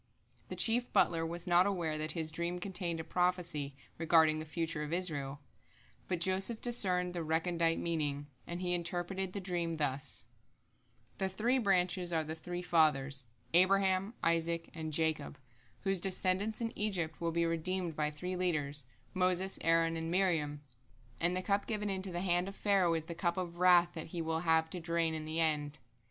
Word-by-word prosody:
The - - -4
chief 240 +2 +3
butler 165 -1 +3
was 170 +1 -4
not 180 +1 +4
aware 170 -6 -1
that 155 0 -1
his 160 -2 -2
dream 170 +2 -2
contained 175 -2 -2
a - - -3
prophecy 170 -6 -1 0.2
regarding 160 -1 +4
the 155 - -5
future 165 -1 -2
of 150 0 -4
Israel, 145 -6 -1 0.7
but 180 -2 -1
Joseph 190 +5 +2
discerned 180 -7 +2
the 175 - -3
recondite 165 +1 +1
meaning, 150 -4 -2 0.2
and 175 +1 -5
he 180 -1 0
interpreted 175 +2 -2
the 200 - -3
dream 175 -3 -2
thus: 145 -2 -1 0.9
The 190 -1 0
three 235 +7 +1
branches 180 -4 +1
are 160 -1 +1
the 155 +1 -5
three 175 +2 -6
Fathers, 145 -6 +2 0.3
Abraham, 190 +3 +3
Isaac, 165 0 0
and 160 -1 -5
Jacob, 155 - -1 0.4
whose 195 -1 0
descendants 195 +4 0
in 230 -1 -3
Egypt 185 -7 -1
will 170 0 0
be 170 +1 +1
redeemed 165 +1 -1
by 150 0 0
three 180 +5 -5
leaders, 150 -6 -1 0.3
Moses, 185 0 +1
Aaron, 165 0 +3
and 165 0 -3
Miriam; 165 -6 0 0.6
and 175 +2 +1
the 185 - -3
cup 200 0 0
given 210 -2 -1
into 190 0 -2
the 175 0 -3
hand 180 -1 +1
of 195 - -7
Pharaoh 190 -5 +2
is 160 -1 -3
the 170 - -6
cup 170 +1 -1
of 175 -2 -4
wrath 175 -1 +6
that 160 - -6
he 170 +1 -4
will 160 0 -1
have 160 -1 +2
to 180 - -3
drain 165 -1 0
in 155 -1 -4
the 160 +1 -3
end. 150 -2 +1
170 Hz, 175 wpm, -33 LUFS, 160-185 Hz, 0.9 s, wrath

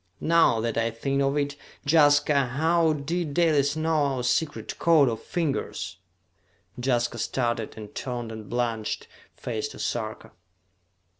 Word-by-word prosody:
Now 165 -8 +4
that 115 0 -1
I 115 0 +1
think 135 +5 -1
of 140 +1 +1
it, 145 -1 -1 0.3
Jaska, 145 -1 +5 0.2
how 165 +1 +3
did 150 +1 -3
Dalis 150 -4 +3
know 155 -1 +1
our 125 - -3
secret 125 +6 -1
code 160 -5 +5
of 115 -2 -2
fingers?" 160 - -3 0.9
Jaska 120 -2 0
started, 115 -1 -1
and 105 -1 -9
turned 120 -3 -4
a - - -6
blanched 115 0 -3 0.3
face 115 +2 -3
to - - -11
Sarka. 110 -2 -4
140 Hz, 135 wpm, -26 LUFS, 120-155 Hz, 0.9 s, Jaska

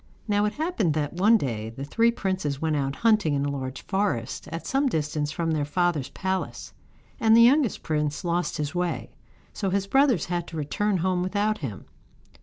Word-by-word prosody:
Now 205 0 +2
it 210 - -1
happened 290 - 0
that 150 -2 -1
one 205 +6 +5
day 110 - -3
the 120 +4 -8
three 230 +10 +3
princes 185 - -2
went 160 -1 0
out 135 -1 -1
hunting 215 -8 +3
in 140 0 0
a 145 - -1
large 130 -1 -5
forest 190 - -2
at 165 - -6
some 275 +1 +1
distance 150 -4 -1
from 165 +1 -1
their 155 -2 0
father's 155 -1 0
palace, 190 0 -3 0.5
and 225 0 +5
the 230 - +8
youngest 260 -1 +3
prince 150 0 -1
lost 175 +1 0
his 150 +1 -3
way, 180 -1 -2 0.4
so 195 - -2
his 195 +1 0
brothers 260 - +3
had 175 -1 -3
to 165 - -7
return 190 +7 0
home 185 -1 +1
without 205 +3 0
him. 115 -10 -6
175 Hz, 190 wpm, -26 LUFS, 145-210 Hz, 0.5 s, the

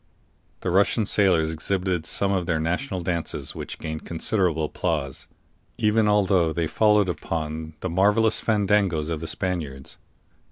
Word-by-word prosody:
The 90 - -1
Russian 100 +4 +3
sailors 90 -6 +2
exhibited 90 0 -2
some 100 -1 0
of 90 -3 -1
their 80 -2 +1
national 90 - -2
dances, 85 -2 -3
which - - -7
gained 80 -1 -5
considerable 85 -2 0
applause, 75 -4 -3 0.5
even 105 0 +2
although 95 -5 +3
they 85 +1 -1
followed 105 +3 +3
upon 80 -2 -4
the 95 - -2
marvelous 105 +5 +3
fandangos 100 -7 +1
of 80 - -2
the 80 - -6
Spaniards. 80 -9 -3
90 Hz, 135 wpm, -24 LUFS, 80-100 Hz, 0.5 s, Russian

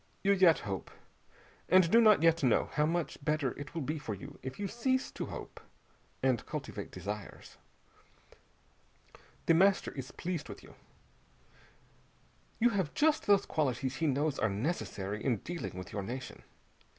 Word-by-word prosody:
You 200 - +4
yet 185 -5 +6
hope, 95 -4 -5 0.8
and 185 -1 +5
do 230 - +7
not 215 -6 +6
yet 165 0 +4
know 125 -5 +2
how 150 0 +2
much 165 -3 -2
better 150 -3 +1
it 145 +2 -9
will 165 - -2
be 155 +3 -2
for 115 -8 -4
you 95 - -11
if 130 0 -6
you 205 - -1
cease 260 +4 0
to - - -5
hope, - - -8 0.6
and 130 -3 +2
cultivate - - -5
desires! 105 -1 -7 1.9
The 165 - +5
Master 195 +4 +4
is 130 -2 -7
pleased 170 -4 -4
with - - -9
you. - - -14 1.9
You 240 +1 +5
have 190 -8 -1
just 310 0 +2
those 200 -1 +5
qualities 135 -3 -1
he 160 - +1
knows 145 +1 0
are 110 - +2
necessary 105 - -3
in 125 -5 +1
dealing 170 - -6
with 90 -1 -8
your 100 - -2
nation. 125 +6 -6
150 Hz, 155 wpm, -32 LUFS, 125-185 Hz, 1.9 s, do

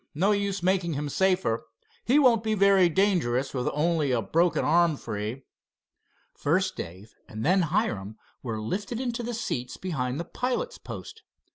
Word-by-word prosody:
No 190 +7 +3
use 200 -2 -1
making 180 -2 +1
him 145 +1 -3
safer. 185 -9 +1 0.4
He 255 +6 +4
won't 250 -6 +5
be 220 -1 0
very 195 -3 +5
dangerous 155 -9 +1
with 125 -2 -1
only 155 -1 +1
a 125 - +2
broken 155 - +1
arm 165 -1 +3
free." 105 +5 -5 0.9
First 185 +6 0
Dave 95 +6 -8 0.2
and 110 +1 -5
then 185 +3 +4
Hiram 135 - -1 0.2
were 115 -4 -4
lifted 200 - -3
into 240 -2 -2
the 240 0 -4
seats 215 - -3
behind 135 -7 -3
the 170 - -3
pilot's 260 - -3
post. 450 - -9
170 Hz, 155 wpm, -27 LUFS, 125-200 Hz, 0.9 s, won't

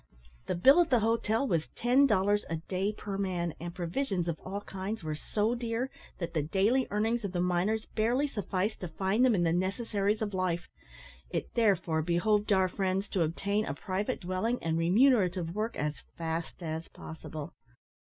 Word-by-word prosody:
The - - 0
bill 270 - +7
at 340 - +1
the 245 -4 +4
hotel 225 +3 +1
was 165 -7 0
ten 255 +4 +4
dollars 205 -1 +2
a 165 - -1
day 185 +5 -2
per 200 -2 -5
man; 175 -4 -1
and 170 +1 -6
provisions 180 +1 -1
of 165 -2 -2
all 200 +2 -5
kinds 195 +1 -5
were 155 -1 -2
so 210 +8 0
dear, 235 +1 -2 0.3
that 170 -2 -4
the 160 - +1
daily 205 - +2
earnings 220 +3 0
of 195 -2 -3
the 175 - -1
miners 180 +5 +1
barely 240 +6 +1
sufficed 205 -4 -2
to 180 - -4
find 190 +8 +1
them 250 -4 +5
in 175 - +2
the 165 -1 +2
necessaries 200 +3 0
of 205 -2 -3
life. 180 -2 -1 0.6
It - - -3
therefore 190 -8 +2
behoved 205 +6 +1
our 190 -1 +4
friends 190 +1 -1
to 185 - 0
obtain 200 +6 0
a 140 - -3
private 190 +8 -2
dwelling 185 +7 -1
and 160 -1 0
remunerative 180 -2 +3
work 215 +3 -2
as 150 0 -2 0.2
fast 165 +1 -4
as 160 0 -4
possible. 155 -1 -8
195 Hz, 180 wpm, -30 LUFS, 175-220 Hz, 0.6 s, bill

